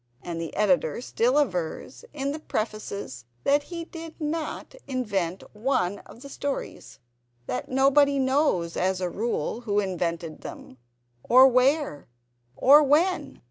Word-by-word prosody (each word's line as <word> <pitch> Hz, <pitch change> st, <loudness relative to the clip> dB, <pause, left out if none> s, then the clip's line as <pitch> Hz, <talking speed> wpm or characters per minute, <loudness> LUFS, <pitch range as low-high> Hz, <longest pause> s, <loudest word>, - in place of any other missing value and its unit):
And 170 Hz, -1 st, -4 dB
the 165 Hz, -, -6 dB
Editor 180 Hz, -6 st, +2 dB
still 250 Hz, +3 st, +1 dB
avers, 180 Hz, -, -3 dB
in 280 Hz, 0 st, -3 dB
Prefaces, 200 Hz, -, -4 dB, 0.2 s
that 285 Hz, +1 st, +3 dB
he 335 Hz, +2 st, -7 dB
did 330 Hz, -1 st, -10 dB
not 310 Hz, 0 st, -4 dB
invent 200 Hz, -9 st, -2 dB
one 210 Hz, -5 st, 0 dB
of 235 Hz, -, -14 dB
the -, -, -8 dB
stories; 280 Hz, 0 st, -5 dB, 0.5 s
that 125 Hz, -, -4 dB
nobody 280 Hz, +2 st, +4 dB
knows, 260 Hz, -, +1 dB
as 185 Hz, 0 st, 0 dB
a 180 Hz, -1 st, -2 dB
rule, 230 Hz, +2 st, -2 dB
who 205 Hz, -3 st, 0 dB
invented 170 Hz, -4 st, -3 dB
them, 130 Hz, -, -10 dB, 0.4 s
or 255 Hz, -, +7 dB
where, 260 Hz, -, +1 dB, 0.5 s
or 285 Hz, -, +7 dB
when. 310 Hz, +6 st, +1 dB
245 Hz, 130 wpm, -26 LUFS, 180-280 Hz, 0.5 s, or